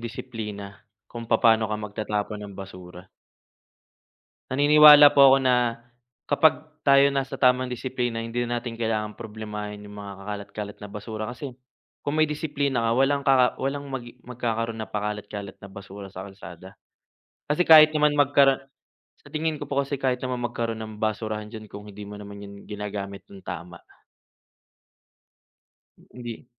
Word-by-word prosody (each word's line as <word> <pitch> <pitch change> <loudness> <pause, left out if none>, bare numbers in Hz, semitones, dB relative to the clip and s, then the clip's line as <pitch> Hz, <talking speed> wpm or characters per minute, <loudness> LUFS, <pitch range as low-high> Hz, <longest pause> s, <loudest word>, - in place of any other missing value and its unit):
disiplina, 105 -4 -7 0.2
kung 115 -1 -9
papa'no 115 -1 +4
ka 105 - -2
magtatapon 105 0 -4
ng 100 - -12
basura. 90 -1 -11 1.4
Naninwala 150 +1 +8
po 140 -1 +7
ako - - +4
na, 125 -2 +1 0.5
kapag 155 0 +3 0.2
tayo 140 0 +6
nasa 135 -1 -2
tamang 125 0 +3
disiplina, 125 -2 -3
hindi 120 +1 -2
na 120 0 -1
natin 115 -2 -7
kailangan 110 -2 -2
problemahin 105 -2 -7
'yong 105 0 -11
mga 100 -1 -7
kakalat-kalat 105 0 -6
na 105 - -8
basura 110 +1 -6
kasi, 125 +4 -6 0.6
kung 145 - -1
may 155 -1 +2
disiplina 145 -3 -1
ka - - +2
walang 140 +2 +2
kaka 130 -2 +6
walang 140 +1 -3
mag 130 -3 -5 0.2
magkakaroon 115 -2 -3
ng 110 -3 -7
pakalat-kalat 105 -1 -5
na - - -11
basura 100 0 -10
sa 95 - -6
kalsada. 95 -2 -12 0.7
Kasi, 150 +4 +3
kahit 155 -1 +9
naman 150 -1 +3
magkara 140 -1 +4 0.6
sa - - -15
tingin 155 0 -1
ko 145 - -5
po 140 0 +1
kasi 140 +1 -3
kahit 130 -2 +1
naman 130 -1 -2
magkaroon 115 -1 -3
ng 110 0 -8
basurahan 110 0 -2
diyan, 110 -1 -9
kung 105 +1 -10
hindi 105 +1 -9
mo 105 - -9
naman 100 0 -10
'yan 100 0 -12
ginagamit 100 -1 -6
nang 95 -1 -12
tama. 85 +1 -7 2.2
H - - -20
hindi 120 -1 -8
115 Hz, 150 wpm, -25 LUFS, 105-135 Hz, 2.2 s, kahit